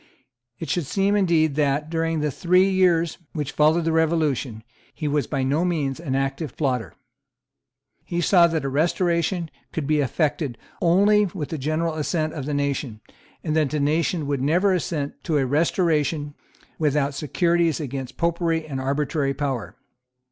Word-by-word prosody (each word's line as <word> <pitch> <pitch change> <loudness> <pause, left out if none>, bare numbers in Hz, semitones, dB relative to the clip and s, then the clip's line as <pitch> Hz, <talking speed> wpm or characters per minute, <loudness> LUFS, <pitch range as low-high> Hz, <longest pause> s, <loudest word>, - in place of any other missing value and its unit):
It 165 - -6
should 170 -6 -1
seem 200 +4 +1
indeed 170 -6 +2
that, 150 +1 0
during 165 -1 0
the 150 -1 0
three 180 +6 +3
years 180 -4 +2
which 150 -3 -3
followed 155 +2 +3
the 165 - +1
Revolution, 155 -8 0 0.3
he 155 - -3
was 145 0 0
by 135 -3 -1
no 145 +6 +1
means 155 -7 -1
an 145 -6 -3
active 135 +1 -2
plotter. 130 -6 -1 1.1
He 175 - -3
saw 175 0 +5
that 160 -4 -2
a - - 0
Restoration 170 +3 0 0.2
could 160 - -3
be 155 +1 +2
effected 145 -2 -1 0.2
only 205 +4 +4
with 170 -5 -6
the 160 - -4
general 155 +4 -1
assent 155 0 -1
of 140 -3 -5
the 150 - -2
nation, 140 -5 -2 0.4
and 155 -2 -1
that 155 -3 +2
the 150 - -2
nation 155 +2 0
would 140 -2 -1
never 175 +8 +3
assent 150 -4 -3
to 155 - +1
a 135 - +2
Restoration 150 0 +1 0.5
without 145 -2 +1
securities 170 +3 +1
against 135 -3 -5
Popery 170 -1 0
and 135 -4 -4
arbitrary 140 +1 -1
power. 135 -4 -3
155 Hz, 160 wpm, -23 LUFS, 140-170 Hz, 1.1 s, saw